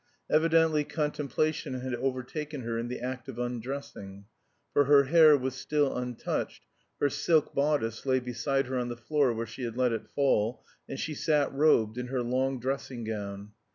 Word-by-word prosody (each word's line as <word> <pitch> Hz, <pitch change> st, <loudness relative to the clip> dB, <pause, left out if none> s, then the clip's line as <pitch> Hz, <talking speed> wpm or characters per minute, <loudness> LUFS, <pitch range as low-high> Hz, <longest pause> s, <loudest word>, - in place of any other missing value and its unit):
Evidently 160 Hz, -1 st, +4 dB
contemplation 150 Hz, -1 st, -1 dB
had 130 Hz, 0 st, -4 dB
overtaken 135 Hz, +4 st, -3 dB
her 115 Hz, -1 st, -3 dB
in 115 Hz, -, -3 dB
the 125 Hz, -, -5 dB
act 130 Hz, +1 st, -5 dB
of 125 Hz, -, -7 dB
undressing, 120 Hz, -5 st, -5 dB, 0.5 s
for 145 Hz, -, +4 dB
her 140 Hz, 0 st, +6 dB
hair 155 Hz, +1 st, +7 dB
was 130 Hz, -1 st, -3 dB
still 145 Hz, +2 st, 0 dB
untouched, 125 Hz, -1 st, -3 dB, 0.3 s
her 145 Hz, -, +3 dB
silk 155 Hz, +2 st, +1 dB
bodice 140 Hz, -6 st, 0 dB
lay 130 Hz, -1 st, +2 dB
beside 125 Hz, +3 st, -1 dB
her 130 Hz, 0 st, -2 dB
on 120 Hz, 0 st, -2 dB
the 120 Hz, -, -5 dB
floor 140 Hz, +1 st, +1 dB
where 115 Hz, 0 st, -3 dB
she 115 Hz, +4 st, -10 dB
had 120 Hz, -1 st, -4 dB
let 125 Hz, -2 st, +2 dB
it 115 Hz, -, -4 dB
fall, 125 Hz, -4 st, +1 dB, 0.2 s
and 135 Hz, -, -5 dB
she 155 Hz, -, -3 dB
sat 150 Hz, -1 st, +1 dB
robed 125 Hz, -6 st, +3 dB
in 125 Hz, -, -4 dB
her 125 Hz, -1 st, -1 dB
long 130 Hz, +2 st, 0 dB
dressing 130 Hz, -1 st, -3 dB
gown. 100 Hz, -2 st, -5 dB
130 Hz, 175 wpm, -29 LUFS, 120-145 Hz, 0.5 s, hair